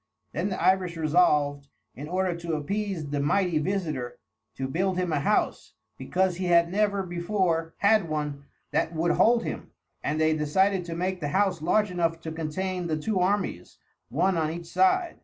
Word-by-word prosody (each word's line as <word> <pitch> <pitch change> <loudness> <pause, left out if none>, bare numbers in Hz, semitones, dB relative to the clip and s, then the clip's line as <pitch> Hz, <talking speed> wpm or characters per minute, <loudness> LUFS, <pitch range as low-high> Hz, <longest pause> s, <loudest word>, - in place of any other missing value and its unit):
Then 175 +6 -2
the 185 - -3
Irish 185 -3 +2
resolved, 150 -3 +2 0.3
in 145 +4 -8
order 180 +1 0
to 170 -1 -4
appease 175 -1 -3
the 145 - -1
mighty 165 +3 +1
visitor, 150 -9 -2 0.4
to 135 - -3
build 185 +6 -1
him 180 -3 0
a 145 - +1
house, 205 +9 0 0.2
because 185 -1 0
he 185 - -2
had 170 -1 +4
never 200 0 +1
before 175 -2 -1
had 200 -4 +3
one 150 -2 -3 0.3
that 165 - 0
would 170 +2 +1
hold 235 +4 +4
him; - - -5 0.3
and 155 - -1
they 155 0 +3
decided 185 +5 +1
to 170 -1 -5
make 185 +2 -2
the 150 - -2
house 190 +2 +1
large 210 +5 +2
enough 165 -2 0
to 160 - -5
contain 175 +3 -3
the 155 -2 -1
two 190 +5 -1
armies, 200 +3 -1 0.3
one 190 -1 +1
on 155 -1 0
each 170 +1 -6
side. 190 - +1
175 Hz, 175 wpm, -27 LUFS, 155-190 Hz, 0.4 s, had